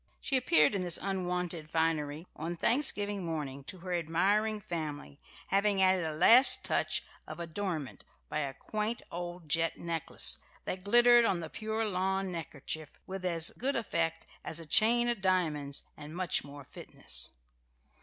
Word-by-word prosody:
She 275 - -1
appeared 170 - +4
in 195 - -1
this 175 -2 +3
unwonted 180 -4 -2
finery 160 -1 -1
on 165 +3 -4
Thanksgiving 205 - +1
morning 145 -5 -4
to 185 - -7
her 180 0 -4
admiring 195 +6 +1
family, 150 -6 -6 0.3
having 200 0 +2
added 185 -1 +4
a 160 - -2
last 235 - +7
touch - - 0 0.2
of - - -8
adornment 170 -4 -4 0.2
by 155 - -3
a 140 -2 -2
quaint 215 +2 -3
old 175 -1 -6
jet 165 +2 0
necklace, 165 -2 0 0.3
that 185 0 -4
glittered 240 +3 +6
on 185 -5 +1
the 165 -2 -7
pure 220 +1 -2
lawn 190 -1 -1
neckkerchief 160 -2 -6 0.2
with 190 0 -6
as 170 -2 +2
good 275 +3 -2
effect 170 -8 -1 0.2
as 160 - -3
a 165 - -8
chain 235 +8 +4
of 240 -4 -1
diamonds 155 -7 0
and 150 +2 -10
much 180 -4 0
more 145 0 -10
fitness. - - -3
175 Hz, 155 wpm, -31 LUFS, 160-200 Hz, 0.3 s, last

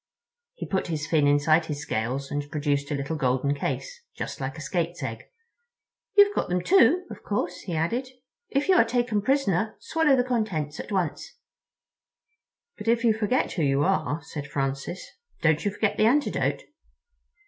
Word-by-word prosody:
He - - -6
put 190 - -1
his 155 -3 -2
fin 155 -3 +2
inside 155 +3 +3
his 150 -1 -4
scales 130 +2 -2
and 145 0 -3
produced 145 -1 -1
a 150 - -1
little 140 +3 -3
golden 135 -1 +1
case, 485 - -4 0.2
just - - -5
like - - -4
a - - -7
skate's - - -2
egg. - - -5 0.9
"You've 405 0 +7
got - - -1
them, 180 0 0
too, 360 - +5
of - - -9
course," 180 -3 -2
he 175 -4 -5
added. 230 +12 -1 0.4
"If 275 +1 0
you 380 - +5
are - - +7
taken 240 -4 0
prisoner 220 -5 +1
swallow 320 -4 +2
the 250 - +2
contents 200 - -2
at - - -7
once." 180 -6 -2 1.4
"But 210 - -7
if 230 +1 +3
you 230 -2 +5
forget 220 +4 0
who 170 - -2
you 140 -1 +2
are," 170 -4 0
said 145 -2 -7
Francis, 140 +5 -3 0.4
"don't 160 -2 +3
you 205 - +1
forget 205 +1 -1
the 215 - +4
antidote?" 285 +5 +1
175 Hz, 170 wpm, -26 LUFS, 145-235 Hz, 1.4 s, You've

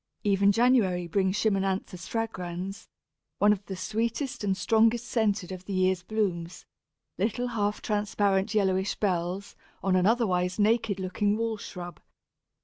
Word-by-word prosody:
Even 200 0 +4
January 210 -6 +3
brings 190 +2 +1
Chimonanthus 195 -4 -1
fragrans, 195 -4 -4 0.5
one 205 +1 +5
of 200 -1 -6
the 190 - -4
sweetest 230 - -2
and 195 -2 0
strongest 225 +4 +3
scented 205 -5 0
of 185 0 -7
the 200 - -5
year's 185 -1 +2
blooms 180 -4 -2 0.5
little 230 +5 0
half 210 -3 -1
transparent 205 -1 0
yellowish 190 -1 +1
bells 185 0 -2 0.3
on 190 -1 +2
an 185 +1 +3
otherwise 185 -6 +1
naked 220 -1 +2
looking 205 +3 0
wall 225 0 -1
shrub. 175 -4 -8
200 Hz, 135 wpm, -28 LUFS, 185-220 Hz, 0.5 s, one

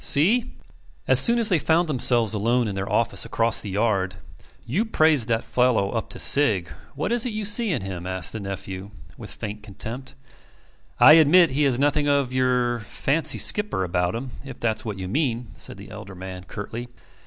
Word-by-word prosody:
See?" 220 - +2 0.5
As - - +8
soon 235 0 +5
as 230 -2 +4
they 180 -5 +2
found 165 +3 +1
themselves 120 -6 +2
alone 115 +3 0
in 100 - -4
their 95 +1 -5
office 115 - +2
across 115 0 0
the 105 - -7
yard: 95 -2 -1 0.5
"You 170 - -1
praised 155 - +2
that 115 -1 -1
fellow 125 -6 0
up 115 - -4
to - - -9
Sigg. 110 -12 +4 0.3
What - - -3
is 240 -1 +2
it 245 - -3
you 215 -1 -4
see 210 +3 +2
in 145 - -2
him?" 90 -2 -7
asked 95 -2 -3
the 110 - -5
nephew, 100 -1 -7 0.3
with - - -11
faint 105 0 -7
contempt. 120 +6 -7 0.8
"I 155 - +8
admit 165 +1 +5
he 140 +3 -1
has 130 -3 +1
nothing 145 +2 0
of 140 -3 0
your 125 -2 0
fancy 145 +7 -1
skipper 210 - +1
about 90 +1 -2
him, 125 +2 -6
if 135 -3 -10
that's 110 0 -2
what 105 -4 -6
you 95 -1 -6
mean," 120 - -2
said - - -7
the 100 +1 -13
elder 105 -2 -10
man, 90 0 -9
curtly. 110 +5 -7
120 Hz, 190 wpm, -23 LUFS, 100-145 Hz, 0.8 s, As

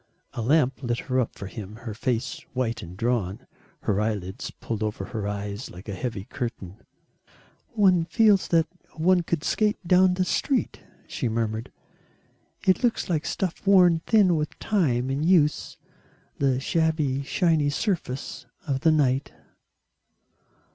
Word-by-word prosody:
A 120 - -4
lamp 135 +2 +2
lit 120 -2 -1
her 130 +1 -1
up 125 - -1
for 100 - -7
him, 105 +1 -8
her 110 - -4
face 115 +1 -2
white 125 -3 -1
and 90 +1 -10
drawn, 110 -4 -1 0.4
her 105 0 0
eyelids 100 -4 -3
pulled 110 -2 -5
over 105 -2 -2
her 105 -1 -4
eyes 105 +2 -4
like 90 +4 -12
a 100 - -4
heavy 100 0 -4
curtain. 105 -5 -6 1.0
"One 185 -6 +4
feels 210 0 +4
that 165 -2 +3 0.3
one 180 +3 +3
could 165 -2 -2
skate 215 -1 +1
down 180 +1 +5
the 185 0 +1
street," 270 +7 0 0.3
she 125 - -3
murmured, 110 0 -2 0.9
"it 185 +6 +3
looks 235 -6 +1
like 155 -2 0
stuff 185 -4 -2
worn 180 -4 +6
thin 200 -6 +5
with 150 -1 -3
time 135 - +1
and 140 +3 -1
use 160 -4 +2 0.6
the 135 -2 +2
shabby 155 -2 0
shiny 155 0 +1
surface 145 - -3 0.2
of 135 -3 -1
the 160 - +4
night." 140 -3 +1
135 Hz, 145 wpm, -25 LUFS, 110-170 Hz, 1.0 s, worn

